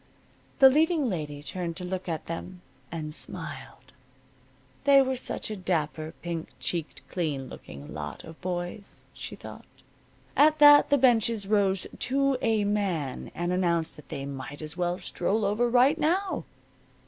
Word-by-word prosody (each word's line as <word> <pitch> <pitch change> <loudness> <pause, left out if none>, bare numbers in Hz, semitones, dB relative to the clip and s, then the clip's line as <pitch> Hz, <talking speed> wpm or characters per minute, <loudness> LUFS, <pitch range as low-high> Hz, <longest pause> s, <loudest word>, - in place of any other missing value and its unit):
The 270 - +9
leading 310 -3 +2
lady 145 -4 -4
turned 170 +2 -4
to 185 - -4
look 185 0 -4
at 160 -2 -3
them, 180 +2 -6 0.3
and 155 -2 -4
smiled. - - -3 0.9
They 280 -1 +7
were 265 -1 +2
such 245 - -4
a - - -3
dapper, 160 -4 -2
pink 170 -2 -3
cheeked, 165 -3 -4
clean 150 -7 -2
looking 70 +1 -10
lot 75 -1 -6
of 160 -1 -12
boys, 180 +2 -5
she - - -7
thought. - - -11 0.7
At 305 +1 +5
that 290 -1 +8
the 285 - +5
benches 230 -5 +3
rose 195 -2 +2
to 275 +1 +2
a 220 -2 +2
man 190 -10 -1
and 175 +1 -1
announced 170 -3 0
that 150 - -15
they 135 - -5
might 140 +1 -7
as 155 -1 -5
well 175 0 -1
stroll 200 +5 -1
over 220 +4 +1
right 255 +6 +4
now. 365 +6 0
185 Hz, 150 wpm, -27 LUFS, 160-245 Hz, 0.9 s, The